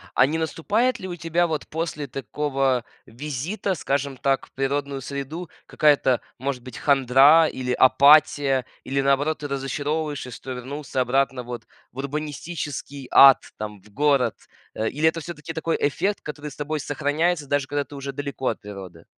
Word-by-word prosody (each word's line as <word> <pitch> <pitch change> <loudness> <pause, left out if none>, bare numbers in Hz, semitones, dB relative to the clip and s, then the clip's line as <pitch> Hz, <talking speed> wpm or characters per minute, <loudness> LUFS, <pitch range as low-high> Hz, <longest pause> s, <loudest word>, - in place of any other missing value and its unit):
А - - +6
не 155 +4 -1
наступает 215 +10 0
ли 190 - -5
у 175 - -5
тебя 170 0 +1
вот 155 -2 -3
после 150 -2 -4
такого 135 -1 -1 0.2
визита, 150 - -3
скажем 140 -2 -2
так, 135 0 0
в - - -30
природную 140 0 -2
среду 140 +6 -6 0.2
какая-то, 140 -4 +3 0.2
может 130 -1 -3
быть, 125 -2 -9
хандра 140 +3 +5
или 125 -3 -3
апатия, 140 0 +5 0.2
или 140 +1 0
наоборот, 140 +3 +1
ты - - -2
разочаровываешься, 145 0 -3
что 130 +2 -7
вернулся 130 +1 -4
обратно 130 0 +1
вот 120 0 -7 0.3
в 125 - -20
урбанистический 145 -1 -5
ад, 135 -1 +8
там 105 -2 -6
в 105 - -20
город? 140 -5 +2 0.4
А. 110 - -1
Или 155 +3 +2
это 165 - -5
всё-таки 165 -1 -7
такой 165 +1 -1
эффект, 195 +8 +1
который 150 0 -7
с - - -12
тобой 150 +1 -3
сохраняется, 150 +2 0
даже 140 -1 0
когда 145 0 -1
ты 145 - -13
уже 140 0 -5
далеко 140 -1 -5
от - - -1
природы? 95 -5 -9
140 Hz, 165 wpm, -24 LUFS, 130-155 Hz, 0.4 s, ад